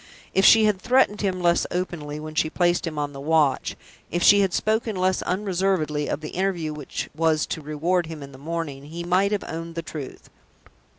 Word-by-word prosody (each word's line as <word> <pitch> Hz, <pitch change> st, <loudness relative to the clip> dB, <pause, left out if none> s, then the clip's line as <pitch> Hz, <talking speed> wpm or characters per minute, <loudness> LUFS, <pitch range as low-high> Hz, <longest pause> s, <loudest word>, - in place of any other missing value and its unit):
If 190 Hz, -, +3 dB
she 220 Hz, -1 st, +8 dB
had 205 Hz, -3 st, +1 dB
threatened 250 Hz, -5 st, +3 dB
him 190 Hz, -3 st, -1 dB
less 170 Hz, 0 st, +3 dB
openly 160 Hz, -5 st, -4 dB
when 155 Hz, 0 st, -7 dB
she 155 Hz, 0 st, +1 dB
placed 175 Hz, +1 st, +1 dB
him 155 Hz, -2 st, -5 dB
on 145 Hz, -1 st, -2 dB
the 135 Hz, -, -8 dB
watch; 150 Hz, -2 st, +1 dB, 0.3 s
if 175 Hz, 0 st, -1 dB
she 205 Hz, -, +7 dB
had 195 Hz, -2 st, +2 dB
spoken 220 Hz, +2 st, 0 dB
less 185 Hz, 0 st, +1 dB
unreservedly 180 Hz, -6 st, 0 dB
of 150 Hz, -, -3 dB
the 155 Hz, -, -6 dB
interview 175 Hz, -4 st, -1 dB
which 150 Hz, -3 st, -5 dB
was 160 Hz, -1 st, +2 dB
to 160 Hz, -, -4 dB
reward 160 Hz, +4 st, 0 dB
him 160 Hz, -3 st, -7 dB
in 140 Hz, -, -10 dB
the 130 Hz, -, -13 dB
morning, 150 Hz, -3 st, -4 dB
he 165 Hz, +3 st, -6 dB
might 185 Hz, +3 st, +2 dB
have 205 Hz, -1 st, -1 dB
owned 165 Hz, +1 st, -6 dB
the 165 Hz, -, -3 dB
truth. 150 Hz, -5 st, -8 dB
170 Hz, 200 wpm, -24 LUFS, 155-190 Hz, 0.3 s, she